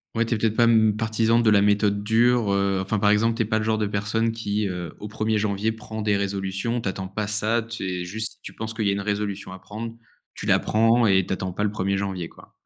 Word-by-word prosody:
ouais, 115 - +2
tu 115 - -1
es - - -1
peut-être 110 0 0
pas, 120 - +4
hem, 110 -2 +4
partisan 110 +1 +2
de 115 -2 +3
la 105 -1 +5
méthode 105 0 +2
dure, 115 0 +3
heu, 100 -1 +1
enfin 100 +2 -1
par 105 - +3
exemple 115 +2 +3
tu 115 - +1
es - - -4
pas 110 0 0
le - - -2
genre 110 -1 +1
de 105 -1 0
personne 105 +3 0
qui, 105 -2 -2
heu, 90 -3 -5
au 105 - -6
premier 110 +1 -1
janvier 105 +1 0
prend 110 0 -7
des 105 -1 +1
résolutions. 100 +4 -2
Tu 100 - -2
attends 95 0 -5
pas 105 +2 -4
ça, 110 +2 +1
tu 115 -1 -6
es 90 -1 -3
juste 110 +5 -1
tu - - -9
penses 110 0 -4
qu'il 110 -2 -2
y - - +3
a 100 - +2
une 100 - -2
résolution 100 -2 -3
à 95 - -9
prendre, 110 +4 -7 0.4
tu - - -7
la - - +4
prends 115 +2 +3
et 95 -2 +3
t'attends 95 0 -3
pas 105 - -2
le 105 - +1
1er 100 -1 -1
janvier, 95 -3 -3
quoi. - - -18
105 Hz, 265 wpm, -24 LUFS, 100-110 Hz, 0.4 s, la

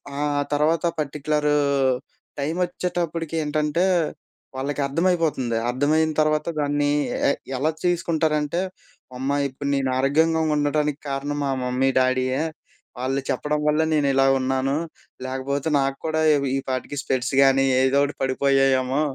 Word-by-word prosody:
ఆ! - - -4 0.4
తర్వాత 155 +3 +1 0.2
particular 150 +1 -1 0.9
time 150 +4 -2
ఒచ్చేటప్పటికి 170 -3 -3
ఏంటంటే 150 +3 0 0.7
వాళ్ళకి 140 +2 -2
అర్థమైపోతుంది. 160 -6 0
అర్థమయిన 150 +5 +2
తర్వాత 155 0 +1
దాన్ని 145 0 +1 0.4
ఎ - - +4 0.3
ఎలా 145 +5 +1
తీసుకుంటారంటే 160 -3 0 0.6
"అమ్మ! 135 +2 -2 0.2
ఇప్పుడు 140 +1 -5
నేను 135 -1 0
ఆరోగ్యంగా 160 +5 +2
ఉండటానికి 150 0 0
కారణం 140 +1 -3
మా 140 - -1
మమ్మీ, 125 +1 +1
డాడీ‌యె. 130 +2 +1 0.6
వాళ్ళు 135 +2 -1
చెప్పడం 150 0 -1
వ‌ల్లే 155 +1 +3
నేను 150 -2 +2
ఇలా 135 0 +4
ఉన్నాను. 135 +1 0 0.5
లేకపోతే 135 +3 -2
నాకు 135 0 -1
కూడా 160 0 0
ఇవి 140 -2 0
ఈపాటికి 130 +2 -4
స్పెక్స్ 130 0 -1
గాని 135 0 +4 0.2
ఏదో 130 +1 +3
ఒకటి 145 +1 -2
పడిపోయాయమో" 135 0 +2
145 Hz, 120 wpm, -23 LUFS, 135-155 Hz, 0.9 s, ఎ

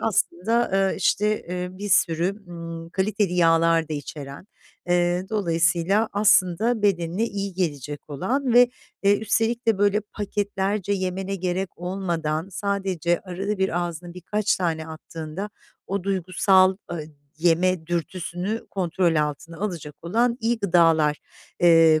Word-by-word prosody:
aslında, 225 +3 +1 0.2
eee, - - -3
işte, 210 +3 +1
eee, 180 0 -3
bir 205 +1 -4
sürü, 190 +2 +1
ımm, 165 -1 -7
kaliteli 200 0 0
yağlar 165 -1 +3
da - - -4
içeren, 145 +2 -7 0.4
eee, 175 +1 +2
dolayısıyla, 175 +1 +2
aslında 205 +2 +3
bedenine 185 +1 +1
iyi 200 -3 -3
gelecek 150 -5 -3
olan 250 - -1
ve 245 0 +7 0.3
eee, 200 +1 +4
üstelik 230 +2 0
de 225 -3 +3
böyle 205 +1 +3
paketlerce 205 -1 -2
yemene 190 0 -2
gerek 185 +1 -3
olmadan, 175 -2 -2
sadece 190 -3 -1
arada 195 +2 -4
bir 190 -2 +1
ağzına 175 0 -5
birkaç 205 +4 0
tane 160 -3 -2
attığında 160 +4 -7 0.4
o 195 0 -2
duygusal, 190 0 +3
aaa, 175 - -4 0.4
yeme 170 0 +2
dürtüsünü 180 +4 -3
kontrol 175 -2 +1
altına 150 +2 -2
alacak 170 -8 -4
olan 235 +8 +1
iyi 230 +1 +1
gıdalar, 165 -6 +3 0.4
eee, 165 -2 +6
185 Hz, 125 wpm, -24 LUFS, 165-200 Hz, 0.4 s, ve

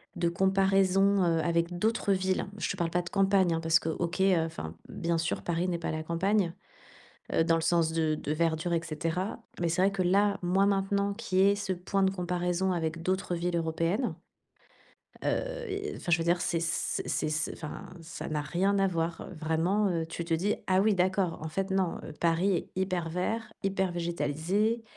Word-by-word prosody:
de 170 - +1
comparaison, 195 +1 +3
heu, 165 -1 +2
avec 170 +1 0
d'autres 215 0 +1
villes, 190 0 0
je - - -2
te 200 - -3
parle 170 -2 0
pas 175 - +1
de 170 - -7
campagne, 195 -3 +3
hein, 165 - 0
parce 165 -1 +4
que 160 - -3
OK, 175 +3 -2
heu, 190 -2 +5
enfin, 85 - -6
bien 170 -1 -1
sûr, 165 0 -1
Paris 170 +1 0
n'est 175 -2 0
pas - - -2
la 155 0 -3
campagne, 175 +2 +1 0.8
heu, - - +4
dans 165 0 +3
le 165 - -1
sens 165 -1 +2
de 160 -1 +1
de 150 - -3
verdure, 165 +1 0
et 165 - +2
cetera. 165 +7 -3 0.2
Mais 170 - +1
c'est 175 +3 +1
vrai 195 - +4
que 195 - 0
là, 200 +3 +3
moi, 190 +3 +3
maintenant 200 0 +1
qu'il 200 -4 -2
y 195 +1 +6
ait - - +3
ce 200 -2 -2
point 185 +2 -1
de 190 - +3
comparaison 180 0 -1
avec 165 -1 -2
d'autres 185 0 -1
villes 175 0 -1
européennes. 165 +8 0 1.1
Heu, - - -1
et 400 +1 -3
enfin, - - -5
je 160 - +5
veux 165 - -1
dire, 175 +1 +2
c'est 170 -2 0
c 160 -1 -1
c'est 155 - -1
c 155 0 -1
enfin, 150 -2 -7
ça 165 +1 -7
n'a 150 -1 -1
rien 195 +6 +1
à 195 - +4
voir, 170 -2 -2
heu, - - -9
vraiment, 170 +6 +1
heu. 170 -3 0
Tu 165 +1 -5
te 165 - +1
dis: 190 +6 0
«Ah 185 0 +3
oui, 215 0 +3
d'accord. 185 -1 +1
En 160 - -3
fait 195 +5 -2
non, 190 -3 0
heu, - - -7
Paris 170 +4 +2
est - - -5
hyper 185 -3 -1
vert, 215 +6 -2
hyper 190 -1 0
végétalisé». 175 +7 0
180 Hz, 210 wpm, -29 LUFS, 165-195 Hz, 1.1 s, y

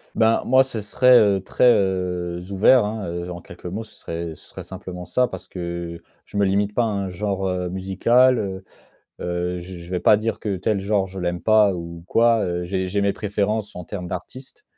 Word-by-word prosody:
Ben, 110 0 +3
moi 130 +1 +5
ce 130 -4 -6
serait, 125 +4 +5
heu, 100 -2 +3
très, 125 +5 +3
heu, 90 -2 -1
ouvert, 105 +4 +5
hein, 105 -1 -4
heu, 85 +1 -4
en 85 0 -7
quelques 85 +2 -14
mots 95 +6 -4
ce 110 - -19
serait 85 0 -5
ce - - -20
serait - - -9
simplement 90 -1 -8
ça. 125 +7 +1
Parce 95 - -9
que 85 -1 -5 0.2
je 105 - -8
me 100 - +3
limite 100 +1 +1
pas 120 - +2
à - - +1
un 100 -3 -2
genre, 95 +1 -2
heu, 90 -1 -2
musical, 115 +8 +3
heu, 95 -3 -4 0.6
heu, 90 0 -2
j 90 0 -9
je 85 - -11
vais 90 - 0
pas - - +6
dire 110 +1 -2
que 100 -3 -2
tel 100 +3 0
genre 100 0 +1
je 95 0 -8
l'aime 90 -1 -2
pas 110 -3 +4
ou 85 -1 -8
quoi, 115 0 +3
heu. 90 0 -2
J'ai 95 +1 -2
j'ai 100 +2 -1
mes 100 0 +2
préférences 105 +1 -2
en 90 - -6
termes 90 0 -6
d'artistes. 125 +9 -8
95 Hz, 215 wpm, -22 LUFS, 90-105 Hz, 0.6 s, pas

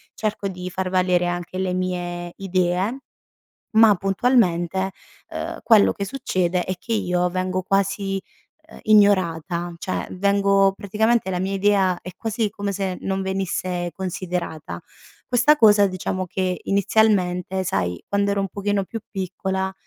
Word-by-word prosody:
cerco 210 -2 -2
di 180 -1 -6
far 185 +1 -3
valere 180 -1 +2
anche 175 +1 -4
le 185 -1 -1
mie 175 -1 -3
idee, 185 +5 0 0.8
ma 220 -2 +7
puntualmente, 190 -3 +1 0.4
uhm, - - -5
quello 220 -3 +6
che 200 - -4
succede 185 -7 -1
è 185 - -2
che 230 - -4
io 180 -4 +1
vengo 185 +1 -1
quasi, 195 0 0 0.5
uhm, - - -13
ignorata 175 -5 +3
cioè, 185 - -3
vengo 200 0 +3
praticamente 220 +2 +1
la 180 -1 -1
mia 190 +2 -2
idea 195 -2 +2
è 180 - -8
quasi 225 0 -2
come 200 0 -4
se 190 -2 -3
non 195 0 -2
venisse 185 -2 -2
considerata. 175 - -4 0.5
Questa 250 +5 +4
cosa, 205 -4 +6
diciamo, 185 0 -3
che 185 0 -2
inizialmente, 190 -2 +1
sai, 90 - -2
quando 200 0 +1
ero 200 - 0
un 195 - -2
pochino 200 +1 -1
più 225 - -6
piccola, 190 0 -3
190 Hz, 140 wpm, -22 LUFS, 180-200 Hz, 0.8 s, ma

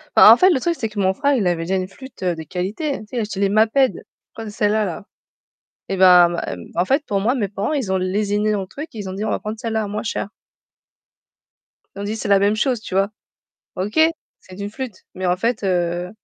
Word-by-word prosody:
Bah, - - +10
en - - +8
fait 370 - +6
le 275 -8 +2
truc 340 +4 0
c'est 225 - -1
que 210 -1 -13
mon 190 -1 +2
frère, 285 +7 +1
il 215 -7 0
avait 175 -2 0
déjà 185 +3 -1
une 185 0 -2
flûte, 260 0 -12
heu, 180 -2 +1
de 160 - -7
qualité. 205 - -3
Tu - - -11
sais, 245 - -6
il - - +1
achetait 210 -3 -3
les 200 - +3
Maped. 220 +6 +2 0.3
Concelala. 210 -4 -1 0.8
Eh 195 - -2
bah, 180 -2 +7
m 170 - -4 0.3
m - - -15
en 175 - +2
fait 275 +10 +1
pour 200 -6 -1
moi, 230 +5 +2
mes 230 -7 -1
parents 200 +4 -3
ils 260 -11 -1
ont 190 - +2
lésiné 205 +3 0
dans 210 - 0
le 190 - -7
truc. 300 - -8
Ils 210 -4 -7
ont - - -5
dit: 200 +2 -4
«On - - -1
va - - -1
prendre 215 +1 -5
celle-là 220 -1 -2
à - - -4
moins 210 +1 -4
cher». 220 - -3 1.7
Ils 200 - -6
ont - - -4
dit: 210 +2 -3
«C'est 220 - -4
la 200 -1 +5
même 205 +2 +2
chose», 245 0 0
tu 220 - -8
vois? 195 +1 +2 0.7
OK, 200 +8 -3 0.4
c'est 185 0 -14
une 200 0 -4
flûte, 255 -1 -6 0.2
mais 185 0 -3
en 180 0 +2
fait, 230 +3 -1
heu, 175 -1 0
205 Hz, 250 wpm, -21 LUFS, 185-225 Hz, 1.7 s, Bah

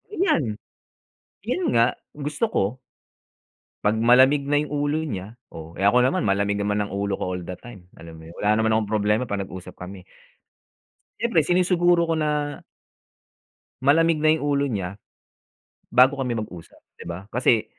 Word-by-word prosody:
Iyan. 335 - +2 1.0
Yun 255 +10 -1
nga, 115 - +4 0.3
gusto 150 +7 -2
ko - - +2 1.2
'pag 105 +2 +2
malamig 130 +5 +5
na 145 +1 +2
yung 150 - -5
ulo 145 +1 -1
niya, 105 -9 -5 0.2
oh. 80 +1 -10
Eh, - - -8
ako 125 +5 +4
naman, 130 - +1
malamig 100 0 +1
naman 105 0 0
ang - - -9
ulo 100 0 -2
ko 90 - -3
all 90 - -4
the 90 +1 -7
time, 100 -7 -14
alam 80 0 -11
mo 80 - -12
yun. 85 - -13
Wala 105 +1 +2
naman 110 +1 +1
akong 110 -1 -3
problema 105 +3 +1
'pag 100 -4 -3
nag-usap 95 -1 -9
kami. 90 0 -10 1.1
Siyempre, 230 -9 +2
sinisiguro 175 0 +2
ko 165 - +1
na 150 -2 -2 1.2
malamig 155 +3 +3
na 155 - +4
yung 145 - -5
ulo 140 -1 +1
niya 95 -5 -3 1.0
bago 130 +3 +5
kami 120 -3 -2
mag-usap, 90 -6 -8 0.2
di 85 - -8
ba? 90 +3 -7
Kasi 120 -2 +2
120 Hz, 160 wpm, -23 LUFS, 100-145 Hz, 1.2 s, malamig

